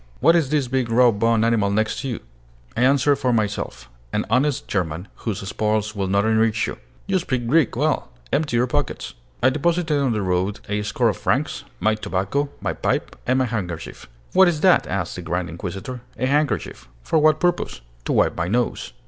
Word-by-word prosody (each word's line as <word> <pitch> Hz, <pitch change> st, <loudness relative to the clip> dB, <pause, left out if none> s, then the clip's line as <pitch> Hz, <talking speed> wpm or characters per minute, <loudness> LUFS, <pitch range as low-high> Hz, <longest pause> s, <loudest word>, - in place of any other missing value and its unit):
What 165 Hz, +5 st, +5 dB
is 160 Hz, -6 st, +2 dB
this 145 Hz, -3 st, +1 dB
big 130 Hz, -1 st, -1 dB
raw 120 Hz, +1 st, +5 dB
boned 115 Hz, +1 st, +2 dB
animal 115 Hz, -4 st, +2 dB
next 110 Hz, +2 st, 0 dB
you?" 125 Hz, -5 st, -3 dB, 0.5 s
I 120 Hz, -, -1 dB
answered 140 Hz, +2 st, +4 dB
for 130 Hz, -3 st, +1 dB
myself: 105 Hz, -, -2 dB, 0.2 s
"An -, -, -1 dB
honest 135 Hz, +3 st, +1 dB
German, 90 Hz, -1 st, -2 dB, 0.2 s
whose 100 Hz, -3 st, -2 dB
spoils 110 Hz, +1 st, -1 dB
will 100 Hz, -1 st, -1 dB
not 100 Hz, +2 st, +2 dB
enrich 110 Hz, 0 st, +2 dB
you." -, -, -6 dB, 0.3 s
"You 195 Hz, -1 st, +1 dB
speak 130 Hz, -8 st, -2 dB
Greek 150 Hz, +1 st, +3 dB
well. 150 Hz, 0 st, 0 dB, 0.2 s
Empty 145 Hz, -4 st, +1 dB
your 120 Hz, -, +3 dB
pockets." 125 Hz, -, -2 dB, 0.3 s
I 130 Hz, -, +6 dB
deposited 160 Hz, +1 st, +1 dB
on 135 Hz, -3 st, +1 dB
the 105 Hz, -3 st, -1 dB
road 95 Hz, +2 st, 0 dB
a 105 Hz, 0 st, -1 dB
score 105 Hz, -, +1 dB
of -, -, -2 dB
francs, -, -, -1 dB
my 110 Hz, -, +2 dB
tobacco, 105 Hz, +7 st, -1 dB
my -, -, -1 dB
pipe, -, -, -1 dB
and 130 Hz, +1 st, +3 dB
my 130 Hz, -, +2 dB
handkerchief. 90 Hz, -, -5 dB, 0.2 s
"What 190 Hz, 0 st, +7 dB
is 160 Hz, -4 st, 0 dB
that?" 185 Hz, 0 st, +5 dB
asked 95 Hz, -2 st, -3 dB
the -, -, -5 dB
grand 85 Hz, +1 st, -2 dB
inquisitor. 95 Hz, +8 st, -6 dB, 0.2 s
"A 125 Hz, -, 0 dB
handkerchief." 140 Hz, -, 0 dB, 0.2 s
"For 160 Hz, -, +2 dB
what 155 Hz, 0 st, +4 dB
purpose?" 175 Hz, -, 0 dB, 0.2 s
"To -, -, 0 dB
wipe -, -, +3 dB
my 85 Hz, -, -1 dB
nose." 120 Hz, +4 st, -1 dB
115 Hz, 190 wpm, -22 LUFS, 100-140 Hz, 0.5 s, What